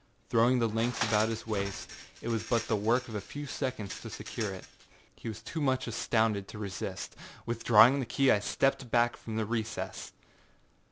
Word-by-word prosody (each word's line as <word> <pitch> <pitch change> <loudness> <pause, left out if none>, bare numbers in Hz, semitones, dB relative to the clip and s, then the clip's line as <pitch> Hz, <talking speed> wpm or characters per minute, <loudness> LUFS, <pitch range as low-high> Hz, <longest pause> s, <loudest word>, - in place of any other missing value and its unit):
Throwing 120 +3 +5
the 115 -2 +2
links 115 +2 0
about 110 -1 +3
his 115 0 -4
waist, 100 -3 -3 0.3
it 115 - -3
was 115 -2 0
but 115 -1 0
the 110 - +2
work 115 +5 +1
of 115 - -8
a 105 - -2
few 145 +7 -7
seconds 130 -7 -4
to - - -7
secure - - -4
it. - - -8 0.5
He - - -9
was 110 0 -6
too 160 +7 -4
much 130 -2 +1
astounded 110 -3 +1
to - - -9
resist. 100 -4 -5 0.3
Withdrawing 115 +3 +6
the 130 - -2
key 135 +3 +3
I 105 - +4
stepped 135 +5 0
back 120 0 +3
from 110 - -7
the 110 -1 0
recess. 110 0 -3
115 Hz, 185 wpm, -31 LUFS, 110-125 Hz, 0.5 s, Withdrawing